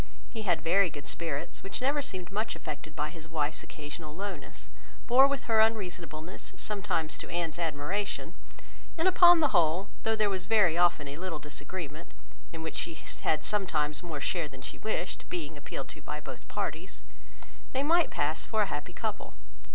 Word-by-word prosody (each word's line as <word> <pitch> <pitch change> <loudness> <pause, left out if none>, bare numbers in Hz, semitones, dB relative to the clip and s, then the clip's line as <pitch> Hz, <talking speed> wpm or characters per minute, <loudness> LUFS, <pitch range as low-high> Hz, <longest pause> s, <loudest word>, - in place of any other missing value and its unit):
He 225 - -4
had 175 -6 +1
very 180 +2 +5
good 145 -2 -8
spirits, 160 -4 -3
which 195 - -5
never 280 +3 +2
seemed 185 -9 -5
much 215 +3 -1
affected 155 0 -6
by 150 0 -1
his 165 -1 -10
wife's 155 -1 0
occasional 150 0 -8
lowness, 180 -10 -6 0.4
bore 260 +3 +8
with 280 -2 -1
her 225 -2 +3
unreasonableness 170 - 0
sometimes 195 -6 -1
to - - -7
Anne's 170 -1 -1
admiration, 165 +5 -2 0.6
and 330 +3 +3
upon 350 -2 +8
the 300 - +5
whole, 175 -1 +3
though 225 0 +2
there 215 -1 +3
was 190 -2 -1
very 200 -7 +5
often 175 -4 +4
a 140 +1 -5
little 175 -2 -3
disagreement 150 -2 -7 0.4
(in 165 -1 -6
which 160 - -4
she 165 - -2 0.3
had 155 - +2
sometimes 155 -8 0
more 165 -5 -4
share 165 +2 0
than 135 -2 -11
she - - -7
wished, 215 -4 -3
being 160 -3 -3
appealed 135 -2 -6
to - - -10
by 150 - -4
both 130 -4 -9
parties), 160 +5 -4 0.7
they 270 - +1
might 335 +3 +5
pass 150 +2 0
for 220 -1 +2
a 200 - -3
happy 145 +5 -4
couple. 215 - -3
170 Hz, 175 wpm, -31 LUFS, 150-205 Hz, 0.7 s, bore